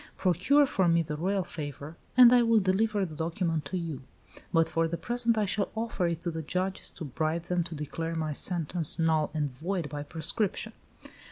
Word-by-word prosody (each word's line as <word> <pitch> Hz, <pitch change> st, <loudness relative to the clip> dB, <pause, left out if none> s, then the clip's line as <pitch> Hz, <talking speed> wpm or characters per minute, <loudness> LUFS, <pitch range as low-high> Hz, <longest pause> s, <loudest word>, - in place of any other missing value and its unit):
Procure 200 Hz, -, +3 dB
for 190 Hz, -9 st, +1 dB
me 170 Hz, 0 st, +3 dB
the 150 Hz, -1 st, -4 dB
royal 190 Hz, +5 st, 0 dB
favor, 145 Hz, -1 st, -6 dB, 0.2 s
and 250 Hz, -1 st, +9 dB
I 245 Hz, -, +6 dB
will 230 Hz, -1 st, +4 dB
deliver 200 Hz, +1 st, +1 dB
the 160 Hz, -, -8 dB
document 165 Hz, -1 st, -2 dB
to 160 Hz, +6 st, -3 dB
you; 165 Hz, -5 st, -4 dB, 0.5 s
but 165 Hz, -2 st, +4 dB
for 165 Hz, 0 st, +1 dB
the 170 Hz, +1 st, -3 dB
present 240 Hz, +1 st, 0 dB
I 215 Hz, -, +2 dB
shall 200 Hz, +1 st, 0 dB
offer 220 Hz, -5 st, -1 dB
it 170 Hz, -1 st, -3 dB
to 175 Hz, -, -1 dB
the 160 Hz, 0 st, -4 dB
judges 185 Hz, +5 st, -2 dB
to 165 Hz, -, -7 dB
bribe 155 Hz, +4 st, -2 dB
them 175 Hz, 0 st, 0 dB
to 170 Hz, -, -5 dB
declare 165 Hz, +2 st, -4 dB
my 155 Hz, -2 st, -2 dB
sentence 170 Hz, 0 st, -1 dB
null 160 Hz, -2 st, +2 dB
and 145 Hz, -3 st, -1 dB
void 165 Hz, +4 st, -3 dB
by 145 Hz, +1 st, -5 dB
prescription." 165 Hz, +7 st, -1 dB
170 Hz, 195 wpm, -29 LUFS, 155-195 Hz, 0.5 s, and